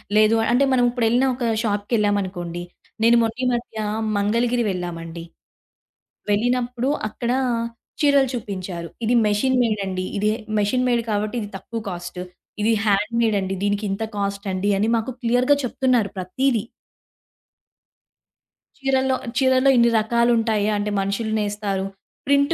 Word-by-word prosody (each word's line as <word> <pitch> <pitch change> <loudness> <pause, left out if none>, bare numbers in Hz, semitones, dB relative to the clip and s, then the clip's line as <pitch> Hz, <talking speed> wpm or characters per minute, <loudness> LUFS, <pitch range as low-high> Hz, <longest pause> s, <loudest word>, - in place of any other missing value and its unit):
లేదు 215 +1 +5 0.2
అంటే 245 +3 +4
మనం 250 -1 +3
ఇప్పుడెళ్ళిన 240 +1 +2
ఒక 250 - -5 0.2
షాప్‌కెళ్ళామనుకోండి. 205 -5 -1 0.4
నేను 230 +1 +6
మొన్న 225 0 0
ఈ - - +2
మధ్య 240 -2 -4 0.4
మంగళగిరి 235 +4 +1
వెళ్ళామండి. 170 -2 -5 1.1
వెళ్ళినప్పుడు 245 +3 0 0.2
అక్కడ 235 +3 -3 0.7
చీరలు 280 -2 +4
చూపించారు. 185 -6 -5 0.2
ఇది 235 +3 +2
మెషిన్ 230 +5 +2
మేడ్ 215 -3 0
అండి. 185 -1 -3
ఇది 210 +1 +1 0.3
మెషిన్ 250 +5 +1
మేడ్ 240 -1 +2
కాబట్టి 210 +2 -1
ఇది 205 - -6
తక్కువ 230 +4 -6
కాస్ట్. 175 -1 -6 0.4
ఇది 225 - +3
హ్యాండ్ 205 +2 +1
మేడ్ 220 -3 +2
అండి. 190 0 -3
దీనికింత 205 0 -1
కాస్ట్ 200 0 -3
అండి 185 +2 0
అని 210 +3 +1
మాకు 225 +2 -2
క్లియర్‌గా 245 +4 +3
చెప్తున్నారు 250 -4 +1
ప్రతీదీ. 225 +5 0 2.2
చీరల్లో, 265 -1 +2 0.2
చీరల్లో 260 0 +4
ఇన్ని 235 0 +5
రకాలుంటాయా 225 -2 +2
అంటే 205 0 -2
మనుషులు 200 +3 -1
నేస్తారు. 205 -2 -2 0.4
ప్రింట్ 280 +2 +3
220 Hz, 125 wpm, -22 LUFS, 200-245 Hz, 2.2 s, నేను